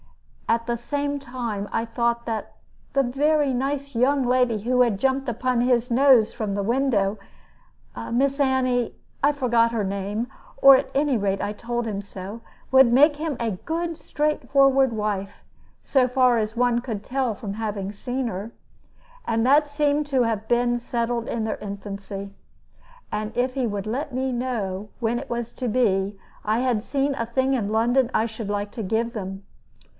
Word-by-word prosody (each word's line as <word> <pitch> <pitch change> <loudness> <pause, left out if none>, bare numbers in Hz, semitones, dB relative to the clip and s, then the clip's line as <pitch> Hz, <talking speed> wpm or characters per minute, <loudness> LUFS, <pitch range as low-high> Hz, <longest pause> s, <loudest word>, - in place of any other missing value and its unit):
At 230 0 +2
the 240 0 -1
same 285 +4 -2
time 240 -6 -4
I 225 - 0
thought 235 0 -1
that 225 -2 -4 0.4
the 275 - +2
very 285 +2 +2
nice 275 +1 -2
young 265 +3 +2
lady 250 -3 +2
who 250 +3 +3
jumped 265 +5 0
upon 245 +1 0
his 245 -1 +2
nose 250 -3 +5
from 210 -4 -3
the 200 - -1
window, 220 -4 +1 0.9
Miss 275 +3 +1
Annie 255 -3 +1 0.3
I 285 - +5
forgot 240 -5 +2
her 225 -3 -1
name, 200 +4 -2 0.3
or 275 0 +9
at - - -1
any 280 -2 +2
rate 195 -2 0
I 205 - -2
told 240 +2 -3
him 205 -3 -3
so 200 +2 -8 0.3
would 265 -2 +7
make 290 +5 +6
him 300 -3 -3
a 230 -1 -1
good 330 - -3
straightforward 275 -4 +2
wife, 205 -2 -2 0.5
so 260 -3 +3
far 250 -1 +3
as 220 +1 -2
one 245 -1 +2
could 225 -5 -4
tell 255 -2 -1
from 200 -1 -6
having 205 -2 -4
seen 250 +4 -3
her. 210 +1 -5 0.7
And 225 +1 +1
that 290 +3 +4
seemed 290 0 +1
to 265 -3 +2
have 220 -2 -2
been 240 0 +2
settled 235 0 -2
in 225 -2 -2
their 220 - -2
infancy. 200 -1 -7 0.8
And 215 +1 -3
if 250 +1 +1
he 260 -3 0
would 205 -1 -4
let 265 +5 -3
me 260 0 -1
know 215 -6 -3
when 235 0 0
it - - -9
was 235 0 -3
to 250 -2 -3
be, 200 -4 +1 0.2
I 215 +2 +1
had 245 -4 0
seen 275 +2 0
a 230 -3 -3
thing 260 +3 +1
in 220 -6 0
London 240 +3 +2
I 220 - +2
should 220 -2 -6
like 205 0 -2
to 225 - -5
give 225 +4 -1
them. 195 -2 -6
240 Hz, 170 wpm, -24 LUFS, 215-265 Hz, 0.9 s, or